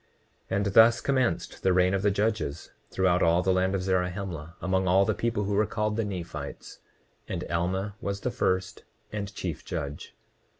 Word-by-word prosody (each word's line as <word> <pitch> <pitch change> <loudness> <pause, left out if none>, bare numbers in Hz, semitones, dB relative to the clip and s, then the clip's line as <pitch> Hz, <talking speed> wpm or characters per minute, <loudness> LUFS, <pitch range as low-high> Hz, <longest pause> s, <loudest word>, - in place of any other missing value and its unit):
29:44 95 - 0
And 100 - 0
thus 115 +2 +7
commenced 130 -3 0
the 95 - +3
reign 90 +1 +3
of 95 - +1
the 105 - +3
judges 100 -7 -1 0.2
throughout 90 -1 +2
all 85 +2 +4
the 95 +1 +3
land 95 +1 +1
of 95 - -1
Zarahemla, 90 -3 -2
among 95 0 0
all 95 +2 +5
the - - +1
people 115 -3 -1
who 100 +1 -1
were 105 +1 +2
called 105 0 -1
the 115 - 0
Nephites; 85 -8 -6 0.5
and - - -3
Alma 95 +4 -1
was 100 0 -3
the 125 - -1
first 95 -2 -1 0.3
and 100 -2 -4
chief 85 -5 -4
judge. 75 -5 -5
95 Hz, 180 wpm, -27 LUFS, 90-105 Hz, 0.5 s, thus